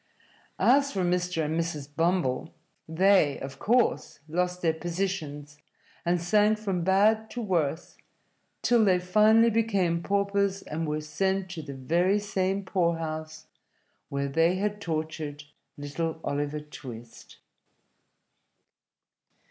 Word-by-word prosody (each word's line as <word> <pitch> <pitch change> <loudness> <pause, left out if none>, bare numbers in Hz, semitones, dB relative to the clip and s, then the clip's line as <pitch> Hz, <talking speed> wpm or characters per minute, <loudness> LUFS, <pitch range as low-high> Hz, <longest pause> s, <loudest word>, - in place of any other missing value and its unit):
As 280 +2 +4
for 190 -2 -1
Mr. 180 -2 0
and 155 +2 -2
Mrs. 160 -4 -3
Bumble, 165 -5 0 0.4
they, 180 -3 +3
of 135 0 -8
course, 240 +3 +1
lost 180 +2 -2
their 165 -1 +3
positions, 160 -4 -4 0.4
and 175 0 +1
sank 210 +5 +3
from 195 -5 -2
bad 215 +4 +3
to 245 - -6
worse 165 -6 -1 0.7
till 240 -2 +4
they 190 -3 +4
finally 215 +5 +4
became 200 -7 +1
paupers 200 0 0
and 160 +1 -4
were 150 0 -2
sent 190 +5 -1
to 170 -3 -5
the 140 -2 -8
very 170 +9 +1
same 195 -1 -1
poorhouse 160 -4 -2 0.6
where 140 0 -2
they 165 +5 +2
had 205 +2 -2
tortured 155 -3 -4 0.3
little 160 +3 -3
Oliver 145 +1 -2
Twist. 120 -6 -11
175 Hz, 115 wpm, -27 LUFS, 155-195 Hz, 0.7 s, As